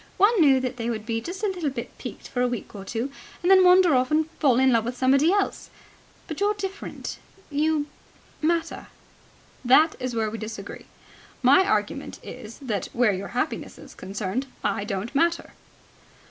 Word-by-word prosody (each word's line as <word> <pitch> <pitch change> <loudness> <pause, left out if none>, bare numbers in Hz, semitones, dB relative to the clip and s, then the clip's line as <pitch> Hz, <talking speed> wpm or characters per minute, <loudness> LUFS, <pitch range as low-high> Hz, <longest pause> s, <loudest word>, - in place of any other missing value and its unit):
One 410 0 +4
knew 275 -4 +6
that 255 0 -3
they 230 0 -2
would 215 -2 -4
be 225 0 -2
just 370 - -7
a - - +3
little 355 -6 -2
bit 260 -3 -7
piqued - - -8
for 245 - -2
a 250 - +3
week 245 -3 -5
or 200 -2 -8
two 230 +7 -3 0.3
and 360 - +3
then 380 -1 +8
wander 360 -2 +6
off 255 0 +2
and 310 0 +2
fall 265 -6 +4
in 260 0 +4
love 230 -2 +3
with 245 +2 -4
somebody 275 +6 +4
else. 405 0 -1 0.6
But 315 -5 -6
you're 410 +1 +2
different. 395 0 -6 0.3
You... 300 +1 +1 0.6
matter." 330 +1 -1 0.8
"That 295 +6 +5
is 255 -2 -3
where 220 -1 0
we 225 - -5
disagree. 215 -2 -8 0.6
My 325 +10 +6
argument - - -1
is 220 - -9
that, 215 -7 -2
where 235 -3 +3
your 195 +1 -4
happiness 280 - -2
is - - -13
concerned, 200 +6 -4 0.2
I 200 - -1
don't 205 +3 -4
matter." 335 +4 +1
260 Hz, 180 wpm, -25 LUFS, 230-335 Hz, 0.8 s, then